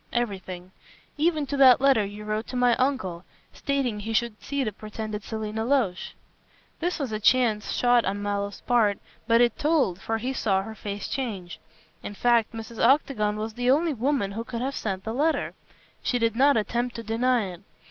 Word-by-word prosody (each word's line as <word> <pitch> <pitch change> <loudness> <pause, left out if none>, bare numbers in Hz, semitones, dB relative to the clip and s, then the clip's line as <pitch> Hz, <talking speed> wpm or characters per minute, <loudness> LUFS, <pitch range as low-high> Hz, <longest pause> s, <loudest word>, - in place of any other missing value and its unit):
"Everything, 190 -6 -3 0.4
even 310 -1 +1
to 285 - -3
that 260 -3 +7
letter 270 -5 +4
you 205 +1 -7
wrote 215 +1 -2
to - - -7
my 245 -1 +4
uncle, 255 -11 -1 0.3
stating 270 -6 -1
he 220 +2 -4
should 230 -1 -1
see 280 -1 -2
the 215 - -2
pretended 215 0 -6
Selina 220 0 -4
Loach." 230 -8 0 0.6
This 350 +2 -1
was 275 -7 -3
a 215 - -2
chance 220 -2 +2
shot 245 -1 +3
on 200 +1 -2
Mallow's 200 0 -3
part, 220 -5 +2 0.3
but 230 0 +5
it 240 -1 +2
told, 290 - +1
for 225 - -1
he 255 +4 -3
saw 195 -6 +1
her 220 +2 -7
face 205 -2 -5
change. 200 -10 -4 0.4
In 205 - -7
fact, 235 0 +2
Mrs. 225 0 -6
Octagon 235 -5 +3
was 215 +1 -4
the 245 +2 -1
only 310 +4 +3
woman 255 -4 0
who 225 +3 -4
could 235 -1 -5
have 270 +1 -2
sent 190 -3 -3
the 220 - -4
letter. 305 +6 0 0.5
She 250 - 0
did 230 -2 +1
not 275 +1 +4
attempt 240 +3 -1
to 230 - -5
deny 235 +2 +1
it. 175 - -13
230 Hz, 190 wpm, -26 LUFS, 210-255 Hz, 0.6 s, that